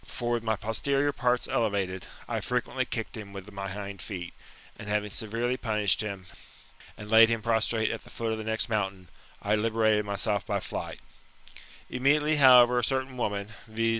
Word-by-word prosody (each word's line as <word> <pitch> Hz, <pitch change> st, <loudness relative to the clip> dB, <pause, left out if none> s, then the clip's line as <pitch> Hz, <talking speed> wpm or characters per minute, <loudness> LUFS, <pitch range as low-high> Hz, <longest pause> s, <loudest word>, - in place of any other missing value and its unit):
For 120 Hz, -1 st, -4 dB
with 120 Hz, -1 st, 0 dB
my 110 Hz, -1 st, +1 dB
posterior 135 Hz, +7 st, 0 dB
parts 125 Hz, -2 st, +1 dB
elevated, 100 Hz, -5 st, -1 dB, 0.2 s
I -, -, -2 dB
frequently -, -, -1 dB
kicked -, -, -4 dB
him 100 Hz, -2 st, -8 dB
with 100 Hz, +1 st, -9 dB
my 100 Hz, -1 st, -5 dB
hind 100 Hz, 0 st, -6 dB
feet, 90 Hz, -4 st, -6 dB, 0.4 s
and 105 Hz, -, -9 dB
having 105 Hz, 0 st, -1 dB
severely 115 Hz, +4 st, -2 dB
punished 105 Hz, -5 st, +1 dB
him, 100 Hz, -3 st, -5 dB, 0.7 s
and 105 Hz, -, -9 dB
laid 115 Hz, +1 st, +7 dB
him 115 Hz, -2 st, -1 dB
prostrate 110 Hz, -1 st, +1 dB
at 115 Hz, -, -6 dB
the -, -, -15 dB
foot 115 Hz, -1 st, -3 dB
of 110 Hz, -, -2 dB
the -, -, -4 dB
next 110 Hz, +2 st, +1 dB
mountain, 95 Hz, -5 st, -2 dB, 0.3 s
I 105 Hz, -, +1 dB
liberated 110 Hz, -1 st, +2 dB
myself 100 Hz, 0 st, 0 dB
by -, -, -1 dB
flight -, -, -6 dB, 0.9 s
Immediately, 150 Hz, +4 st, +2 dB
however, 125 Hz, -3 st, +7 dB
a -, -, -2 dB
certain 130 Hz, +2 st, -1 dB
woman, 100 Hz, -4 st, -2 dB, 0.2 s
via. 115 Hz, +1 st, 0 dB
110 Hz, 175 wpm, -28 LUFS, 100-120 Hz, 0.9 s, laid